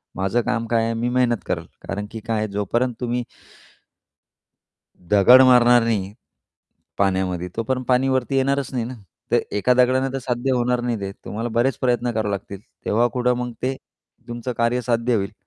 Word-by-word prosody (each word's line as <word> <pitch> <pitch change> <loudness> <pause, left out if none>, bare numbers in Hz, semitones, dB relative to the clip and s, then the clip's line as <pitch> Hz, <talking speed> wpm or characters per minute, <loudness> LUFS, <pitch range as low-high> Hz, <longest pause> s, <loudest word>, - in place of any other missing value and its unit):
माझं 95 +5 0
काम 115 0 -1
काय 115 0 +1
आहे 115 - -1
मी 115 +2 -1
मेहनत 125 -1 +2
करेल." - - -3 0.2
कारण 105 +1 -3
की 115 - -6
काय 110 +1 -2
आहे, 110 0 -1
जोपर्यंत 110 +5 -1
तुम्ही 120 0 -1 1.8
दगड 105 +8 +6
मारणार 125 -2 +6
नाही, 100 -4 -1 0.9
पाण्यामध्ये, 95 -2 0
तोपर्यंत 130 +3 -2
पाणी 130 +1 +3
वरती 130 +1 0
येणारच 135 0 0
नाही 120 -2 -1
ना. 125 +3 -6 0.4
तर - - +5 0.2
एका 125 +5 +3
दगडाने 130 +1 +2
तर - - 0
साध्य 125 +1 -1
होणार 125 0 +1
नाही 120 -3 -2
ते, 100 0 -4
तुम्हाला 115 +3 -3
बरेच 120 +4 +1
प्रयत्न 120 -1 +1
करावे 110 -2 -1
लागतील, 100 0 -6 0.2
तेव्हा 115 +3 +2
कुठं 125 0 +2
मग 125 0 -4
ते 130 +1 0 0.5
तुमचं 120 +1 -4
कार्य 115 +1 +1
साध्य 120 0 0
होईल. 100 0 -2
120 Hz, 170 wpm, -22 LUFS, 110-125 Hz, 1.8 s, दगड